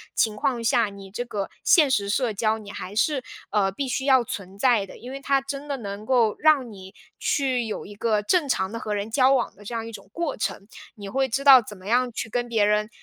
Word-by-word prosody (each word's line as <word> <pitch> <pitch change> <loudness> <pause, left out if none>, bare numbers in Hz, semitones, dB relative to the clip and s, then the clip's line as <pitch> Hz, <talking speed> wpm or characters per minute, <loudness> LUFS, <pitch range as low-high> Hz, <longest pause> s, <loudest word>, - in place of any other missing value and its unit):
情 220 -2 +2
况 235 +3 -1
下， 235 -1 +3
你 200 -1 -11
这 230 +4 -3
个 205 -5 -4
现 310 -6 +5
实 200 -6 +1
社 235 +1 0
交 215 +2 0
你 205 -2 -10
还 190 0 -7
是， 265 +4 +1 0.3
呃， 200 -2 +2
必 270 +8 -4
须 265 +1 -2
要 260 -3 +5
存 195 -3 -7
在 230 -2 +3
的。 - - -13
因 245 +2 -9
为 275 - -6
它 275 0 +2
真 275 +1 -6
的 280 -1 -2
能 205 -2 -7
够 235 -4 +3
让 290 -6 +3
你 190 -1 -12 0.3
去 260 -4 0
有 215 - -5
一 205 - -10
个 215 0 +1
正 310 - +1
常 190 -6 0
地 230 - -5
和 215 -3 -3
人 205 +1 -3
交 260 +2 +4
往 255 -3 0
的 205 - -16
这 210 - -7
样 225 -1 -3
一 - - -7
种 200 -3 -11
过 335 +4 -3
程。 200 -1 -4 0.3
你 205 -3 -9
会 265 +6 0
知 270 +4 -1
道 270 -3 +9
怎 210 -2 -10
么 185 +1 -13
样 245 +2 +2
去 225 - -5
跟 240 +2 -2
别 225 -3 +2
人， 210 +1 +1
230 Hz, 265 characters per minute, -24 LUFS, 205-265 Hz, 0.3 s, 道